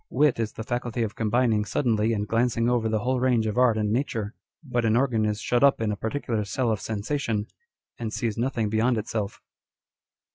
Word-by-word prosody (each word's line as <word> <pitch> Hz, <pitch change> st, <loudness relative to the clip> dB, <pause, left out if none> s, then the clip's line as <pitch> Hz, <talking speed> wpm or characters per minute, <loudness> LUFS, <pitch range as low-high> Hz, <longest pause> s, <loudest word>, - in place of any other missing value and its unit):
Wit 150 Hz, -5 st, +2 dB
is 115 Hz, -1 st, -2 dB
the 110 Hz, -, -6 dB
faculty 120 Hz, 0 st, -2 dB
of 110 Hz, -1 st, -3 dB
combining 110 Hz, 0 st, +1 dB
suddenly 110 Hz, -1 st, +1 dB
and 105 Hz, -2 st, -1 dB
glancing 115 Hz, +1 st, +1 dB
over 120 Hz, -2 st, +1 dB
the 110 Hz, -1 st, 0 dB
whole 130 Hz, +2 st, 0 dB
range 125 Hz, -3 st, +2 dB
of 110 Hz, -, -1 dB
art 125 Hz, -3 st, +4 dB
and 105 Hz, -1 st, 0 dB
nature; 115 Hz, -4 st, -1 dB, 0.3 s
but 125 Hz, -5 st, -1 dB
an 110 Hz, -1 st, +3 dB
organ 120 Hz, -4 st, +2 dB
is 105 Hz, 0 st, -1 dB
shut 120 Hz, +4 st, +1 dB
up 140 Hz, -1 st, +5 dB
in 110 Hz, -2 st, 0 dB
a -, -, -1 dB
particular 110 Hz, 0 st, -2 dB
cell 115 Hz, +4 st, -1 dB
of 110 Hz, -, -2 dB
sensation, 110 Hz, 0 st, -2 dB, 0.5 s
and 115 Hz, -2 st, -3 dB
sees 115 Hz, -2 st, -2 dB
nothing 120 Hz, -2 st, -1 dB
beyond 110 Hz, +3 st, +1 dB
itself. 105 Hz, -1 st, -4 dB
115 Hz, 195 wpm, -26 LUFS, 110-125 Hz, 0.5 s, up